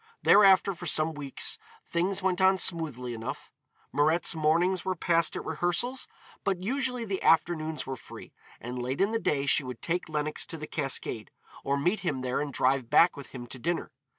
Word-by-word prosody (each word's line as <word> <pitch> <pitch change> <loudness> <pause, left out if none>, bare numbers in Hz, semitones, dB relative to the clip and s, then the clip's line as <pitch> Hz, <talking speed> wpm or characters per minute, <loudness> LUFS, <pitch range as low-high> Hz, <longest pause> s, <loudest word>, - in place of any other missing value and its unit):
Thereafter 195 -1 +6
for 175 0 -7
some 155 +1 +1
weeks 145 -3 -1 0.3
things 185 +3 -1
went 190 -1 +1
on 190 0 +5
smoothly 150 -10 0
enough. 115 0 -7 0.4
Mirette's 155 +4 +3
mornings 170 +4 +1
were 185 0 -1
passed 170 0 +1
at - - -5
rehearsals, 175 +11 -1 0.4
but 190 -2 -1
usually 250 +1 -2
the 195 -3 -3
afternoons 160 -1 +2
were 135 - -4
free, 115 - -12 0.3
and 125 +1 -6
late 130 +3 -3
in 200 +2 +2
the 225 - 0
day 140 -9 0
she 145 - +4
would 125 -2 -7
take 175 0 -2
Lenox 150 0 -2
to 165 - -6
the 155 - -6
Cascade, 135 -7 -2 0.3
or 140 +1 0
meet 175 +9 0
him 145 -9 -2
there 130 +2 -1
and 145 -1 -3
drive 130 -2 +1
back 170 - +5
with 140 -3 -9
him 125 -2 -8
to 130 +2 -9
dinner. 170 +7 -2
160 Hz, 185 wpm, -28 LUFS, 140-185 Hz, 0.4 s, Thereafter